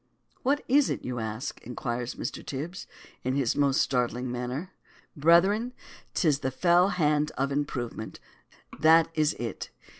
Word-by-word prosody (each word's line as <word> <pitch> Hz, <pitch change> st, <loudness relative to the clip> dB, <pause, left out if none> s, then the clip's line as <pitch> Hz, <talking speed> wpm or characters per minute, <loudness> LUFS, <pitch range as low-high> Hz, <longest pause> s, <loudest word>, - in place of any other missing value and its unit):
What 280 Hz, +3 st, +1 dB
is 275 Hz, +2 st, +4 dB
it, -, -, -3 dB
do -, -, -6 dB
you 125 Hz, -1 st, -3 dB
ask? 110 Hz, +2 st, -4 dB
inquires 120 Hz, 0 st, -4 dB
Mr. -, -, -5 dB
Tibs, 155 Hz, +7 st, -6 dB, 0.4 s
in 130 Hz, +1 st, 0 dB
his 135 Hz, -5 st, +1 dB
most 140 Hz, -2 st, +2 dB
startling 125 Hz, -1 st, 0 dB
manner. 125 Hz, +9 st, -4 dB, 0.4 s
Brethren, 190 Hz, -, +4 dB, 0.4 s
'tis 150 Hz, -5 st, +2 dB
the 130 Hz, -, -1 dB
fell 175 Hz, +7 st, +4 dB
hand 150 Hz, -4 st, +1 dB
of 135 Hz, +1 st, 0 dB
improvement. 130 Hz, -6 st, -3 dB, 0.6 s
That 160 Hz, +2 st, +6 dB
is 155 Hz, -1 st, +2 dB
it. 115 Hz, -1 st, -5 dB
145 Hz, 145 wpm, -28 LUFS, 125-170 Hz, 0.6 s, That